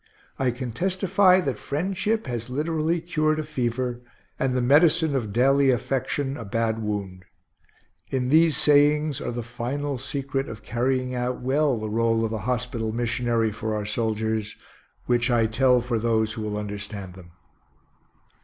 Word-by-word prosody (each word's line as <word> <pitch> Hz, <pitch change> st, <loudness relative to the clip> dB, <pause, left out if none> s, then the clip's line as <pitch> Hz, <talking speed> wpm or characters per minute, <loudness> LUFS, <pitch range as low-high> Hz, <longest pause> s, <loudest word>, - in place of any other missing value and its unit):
I 130 Hz, -, +2 dB
can 125 Hz, 0 st, -4 dB
testify 185 Hz, -, +3 dB
that 135 Hz, -9 st, -3 dB
friendship 190 Hz, +8 st, -1 dB
has 120 Hz, -3 st, -4 dB
literally 160 Hz, +4 st, 0 dB
cured 155 Hz, -2 st, 0 dB
a 155 Hz, -, -2 dB
fever, 125 Hz, -4 st, -2 dB, 0.4 s
and 130 Hz, -1 st, 0 dB
the -, -, +2 dB
medicine 155 Hz, +3 st, +4 dB
of 115 Hz, -6 st, -2 dB
daily 135 Hz, +4 st, +4 dB
affection, 135 Hz, +2 st, -1 dB
a -, -, -6 dB
bad 115 Hz, +1 st, -1 dB
wound. 100 Hz, -4 st, -4 dB, 0.9 s
In 125 Hz, -2 st, -1 dB
these 160 Hz, +1 st, +4 dB
sayings 150 Hz, 0 st, +3 dB
are -, -, -3 dB
the 120 Hz, 0 st, -4 dB
final 130 Hz, +4 st, -3 dB
secret 135 Hz, +1 st, -3 dB
of 110 Hz, -, -9 dB
carrying 130 Hz, +1 st, -1 dB
out 125 Hz, 0 st, -2 dB
well 135 Hz, +1 st, +1 dB
the 110 Hz, -, -5 dB
rôle 115 Hz, +1 st, +1 dB
of 110 Hz, -, -3 dB
a 110 Hz, -, -2 dB
hospital 120 Hz, -2 st, -2 dB
missionary 115 Hz, -1 st, 0 dB
for 110 Hz, +1 st, -3 dB
our 105 Hz, -1 st, -3 dB
soldiers, 110 Hz, 0 st, -1 dB, 0.5 s
which 120 Hz, +1 st, +1 dB
I 120 Hz, -2 st, +3 dB
tell 125 Hz, +3 st, +3 dB
for 120 Hz, -1 st, -1 dB
those 110 Hz, -1 st, +1 dB
who 110 Hz, -, -6 dB
will 105 Hz, -1 st, -3 dB
understand 100 Hz, -2 st, -6 dB
them. 85 Hz, -2 st, -14 dB
125 Hz, 155 wpm, -25 LUFS, 110-145 Hz, 0.9 s, medicine